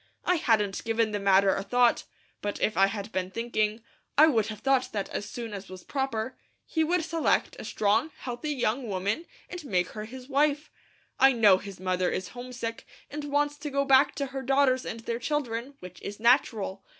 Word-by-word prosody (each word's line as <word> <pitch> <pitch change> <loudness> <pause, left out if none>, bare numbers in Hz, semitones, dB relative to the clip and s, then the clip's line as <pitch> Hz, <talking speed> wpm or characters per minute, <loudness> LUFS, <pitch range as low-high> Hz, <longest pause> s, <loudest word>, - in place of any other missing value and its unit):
I 360 - +3
hadn't 210 -8 +1
given 225 -1 +1
the 205 - -2
matter 195 0 +4
a - - -2
thought, 245 +3 +2 0.4
but 205 0 -3
if 215 - +1
I 195 0 +5
had 205 +1 -5
been 185 -2 -2
thinking, 215 +1 -1 0.3
I 305 - +9
would 225 -9 +2
have 215 -1 -7
thought 270 -1 +2
that 200 -2 -2
as 205 - -4
soon 235 -5 -6
as 200 -2 -7
was 185 -1 -10
proper, 260 -3 -2 0.3
he 320 - 0
would 345 +2 +1
select 330 -1 +1
a - - -6
strong, 210 +9 +1
healthy 245 +4 -5
young 245 -2 -1
woman, 200 - -2 0.2
and 355 -2 -7
make 180 -9 0
her 215 0 -6
his 255 +3 -10
wife. 290 +2 +1 0.5
I 270 0 +7
know 210 -6 +5
his 200 -3 -9
mother 185 -1 0
is 185 - -3
homesick, 245 -2 -6 0.2
and 295 +1 -5
wants 290 0 0
to 295 0 -5
go 280 0 0
back 270 0 +5
to 280 - -1
her 270 0 -5
daughters 265 -1 +2
and 225 - -5
their 230 +1 -3
children, 260 -2 -2
which 180 0 -11
is 205 +1 -7
natural. 220 -5 +2
235 Hz, 200 wpm, -28 LUFS, 205-275 Hz, 0.5 s, I